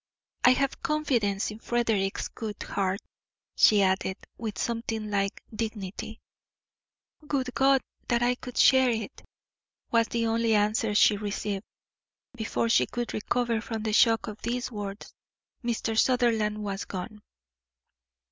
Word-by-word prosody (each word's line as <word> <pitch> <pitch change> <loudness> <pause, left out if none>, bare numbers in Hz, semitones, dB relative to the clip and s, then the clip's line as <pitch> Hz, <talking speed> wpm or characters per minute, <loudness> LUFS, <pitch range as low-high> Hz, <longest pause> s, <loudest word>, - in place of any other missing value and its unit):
"I 250 - +8
have 275 +1 -1
confidence 235 -11 0
in 215 - -9
Frederick's 225 -5 0
good 215 -3 -6
heart," 195 0 -1 0.5
she 205 -2 +6
added, 190 0 +1 0.2
with 220 -2 -5
something 225 -2 -3
like 195 -1 -1
dignity. 215 0 -5 1.1
"Would 260 -3 -1
God 270 0 +4 0.3
that 235 0 +2
I 245 +1 +3
could 250 0 -9
share 260 -1 +6
it!" 225 -3 -3 0.7
was 230 -1 +3
the 230 +1 -1
only 225 0 +2
answer 210 +1 +1
she 210 0 +5
received. 205 -1 -3 0.7
Before 230 0 -1
she 230 - +3
could 240 -1 -4
recover 235 +1 0
from 225 -1 -5
the 215 -1 -1
shock 225 0 +4
of 210 0 -8
these 245 +1 -2
words, 205 -2 -6 0.5
Mr. 230 -1 -1
Sutherland 220 -4 +2
was 200 -1 -3
gone. 210 +3 -6
225 Hz, 130 wpm, -27 LUFS, 205-240 Hz, 1.1 s, I